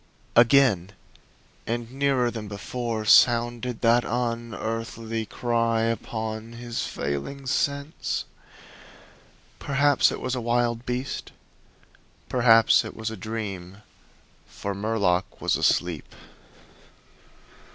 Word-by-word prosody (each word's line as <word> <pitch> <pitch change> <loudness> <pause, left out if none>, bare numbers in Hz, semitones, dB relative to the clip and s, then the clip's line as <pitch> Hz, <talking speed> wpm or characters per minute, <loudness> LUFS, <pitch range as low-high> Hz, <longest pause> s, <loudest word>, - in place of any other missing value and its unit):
Again, 120 -6 +5 0.7
and 120 0 -3
nearer 135 -3 +1
than 110 -2 -6
before, 110 +2 -4
sounded 120 +1 +4
that 120 +1 +4
unearthly 115 -1 -3
cry 115 -1 0
upon 110 0 -3
his 120 0 -4
failing 70 - -4
sense. 140 +2 -1 1.3
Perhaps 140 -1 +3
it - - -5
was 130 - -3
a 125 - -2
wild 120 0 0
beast; 125 +2 -3 1.0
perhaps 115 -3 +5
it - - -8
was 110 0 -4
a - - -5
dream. 100 -2 -6 0.6
For 100 - -5
Murlock 100 -3 0
was - - +1
asleep. 85 -4 0
115 Hz, 95 wpm, -25 LUFS, 110-125 Hz, 1.3 s, Again